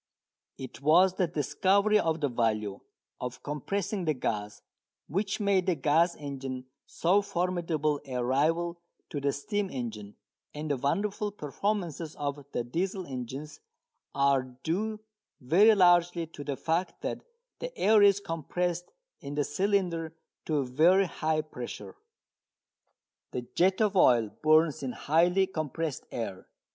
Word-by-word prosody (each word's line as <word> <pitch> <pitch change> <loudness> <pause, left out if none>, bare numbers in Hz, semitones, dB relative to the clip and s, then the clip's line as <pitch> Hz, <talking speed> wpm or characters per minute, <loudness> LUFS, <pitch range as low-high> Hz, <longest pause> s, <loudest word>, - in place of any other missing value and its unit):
It 130 -1 -9
was 175 +6 +5
the 185 -1 +1
discovery 195 +7 +2
of 160 -3 0
the 145 - +2
value 110 -5 -1 0.4
of 125 -1 -6
compressing 185 +6 -3
the 155 -2 +1
gas 105 -4 -3 0.4
which 195 +6 -2
made 200 -3 +2
the 180 - +3
gas 160 +5 +2
engine 135 -3 -6 0.2
so 185 +5 +2
formidable 170 -6 -1
a 125 -2 -2
rival 165 +6 +1 0.3
to 145 - -3
the 140 0 +1
steam 200 +8 -2
engine, 110 - -6 0.4
and 150 0 -3
the 140 - +1
wonderful 205 +10 -1
performances 170 -2 -3
of 145 0 -4
the 120 - -1
Diesel 185 +9 -2
engines 135 +2 -6 0.6
are 140 -1 +3
due 165 - -3 0.4
very 195 - +5
largely 175 -2 +4
to 155 -2 -10
the 140 -2 -3
fact 165 +3 -2
that - - -3 0.4
the - - -6
air 215 - +5
is 200 -1 +6
compressed 175 0 -3 0.3
in 140 +1 -7
the 145 - +1
cylinder 170 -1 0 0.3
to 155 - 0
a 140 - +1
very 165 +10 +4
high 155 -3 -1
pressure. 120 -9 -8 1.4
The 125 - -3
jet 185 +2 +3
of 210 -2 +2
oil 120 - +4
burns 155 0 +4
in 130 -2 -3
highly 175 +5 +3
compressed 155 -4 -4
air. 100 -6 -5
160 Hz, 135 wpm, -29 LUFS, 140-185 Hz, 1.4 s, is